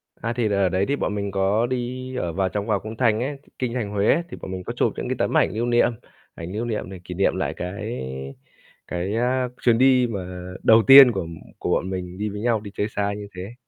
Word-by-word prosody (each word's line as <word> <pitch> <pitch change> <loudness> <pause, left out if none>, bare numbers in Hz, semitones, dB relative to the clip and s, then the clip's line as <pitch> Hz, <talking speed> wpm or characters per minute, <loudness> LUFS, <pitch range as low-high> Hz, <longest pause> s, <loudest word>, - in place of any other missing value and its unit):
À, 115 - -3
thì 120 -3 0
ở 100 -2 +2
đấy 95 +2 +1
thì 140 - +1
bọn 105 - -2
mình 100 -1 -3
có 100 +4 +1
đi 130 +1 -4
ở 85 -9 -2
vào 95 +1 0
trong 105 +3 -3
vào 110 - +1
cung 110 +1 -8
thành 115 -3 +2
ấy, 140 +3 -3 0.2
Kinh 125 -2 -2
thành 115 -5 -2
Huế, 105 +10 +2
thì - - -8
bọn 95 - -6
mình 95 -1 -5
có - - -5
chụp - - +1
những - - -4
cái - - 0
tấm - - +1
ảnh - - +3
lưu 115 +2 -1
niệm, 120 0 +3 0.4
ảnh 85 +2 -7
lưu 115 +3 -2
niệm 110 -5 -3
để 95 -1 -8
kỷ 90 - -7
niệm 100 - +2
lại - - -2
cái 105 - -5 0.9
cái, 90 +5 -3
a, 125 +2 +1
chuyến 120 -2 +4
đi 130 0 +4
mà 90 -4 -6
đầu 110 0 +6
tiên 135 -2 +11
của 95 -6 -3 0.3
của - - -3
bọn 95 - 0
mình 90 -1 -5
đi 105 +1 -2
với 105 +1 -6
nhau 115 -1 +1
đi 100 -1 -9
chơi 105 - 0
xa 100 -1 -1
như 105 0 -7
thế. 95 +5 -7
105 Hz, 250 wpm, -23 LUFS, 95-120 Hz, 0.9 s, tiên